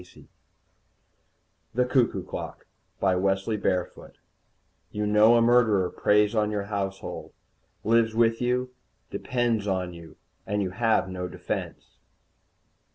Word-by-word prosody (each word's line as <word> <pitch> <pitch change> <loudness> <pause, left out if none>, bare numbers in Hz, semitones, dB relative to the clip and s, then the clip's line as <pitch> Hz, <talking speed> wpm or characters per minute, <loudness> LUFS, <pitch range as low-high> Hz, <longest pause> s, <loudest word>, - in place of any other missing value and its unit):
net 90 - -17 1.5
THE 125 +1 +3
CUCKOO 125 -1 +1
CLOCK - - -7 0.3
BY 95 -1 +2
WESLEY 95 +3 0
BAREFOOT 90 -3 -3 0.7
_You 105 0 -2
know 105 +3 +5
a 115 - +4
murderer 110 -6 +3
preys 105 +1 +2
on 105 -2 +1
your 105 -1 -2
household 100 -1 -5 0.5
lives 115 0 +2
with 115 0 +2
you 125 +1 0 0.4
depends 120 -4 -1
on 90 -2 -1
you 85 -2 -12 0.3
and 105 0 0
you 95 - -3
have 110 -2 +1
no 90 -1 -4
defence! - - -6
105 Hz, 120 wpm, -26 LUFS, 95-115 Hz, 1.5 s, know